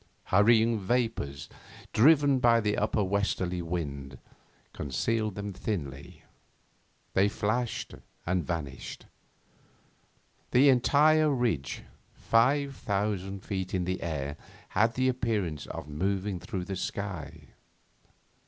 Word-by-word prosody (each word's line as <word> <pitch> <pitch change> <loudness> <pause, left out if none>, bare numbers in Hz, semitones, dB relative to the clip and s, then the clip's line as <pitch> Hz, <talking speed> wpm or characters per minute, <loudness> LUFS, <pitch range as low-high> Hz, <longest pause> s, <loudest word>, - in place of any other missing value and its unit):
Hurrying 110 +3 +5
vapours, 100 - -1 0.5
driven 140 +2 +5
by 120 -2 +5
the 105 -2 0
upper 105 0 +1
westerly 95 -2 -1
wind, 70 -6 -4 0.6
concealed 110 - -1
them 100 0 -5
thinly. 70 -10 -5 0.9
They 100 +2 +4
flashed 110 +4 -2 0.3
and 90 0 0
vanished. 75 -7 -5 1.4
The 135 +3 +6
entire 150 +4 +4
ridge, 120 - -1 0.3
five 135 +4 +2
thousand 100 -2 -2
feet 95 -2 -3
in 90 - 0
the 90 +1 -2
air, 75 -3 -3 0.3
had 115 +2 +2
an 130 0 +2
appearance 110 - -1
of - - -7
moving 95 +5 -2
through 95 -2 -5
the 95 - -4
sky. 90 -6 -5
100 Hz, 105 wpm, -29 LUFS, 90-115 Hz, 1.4 s, The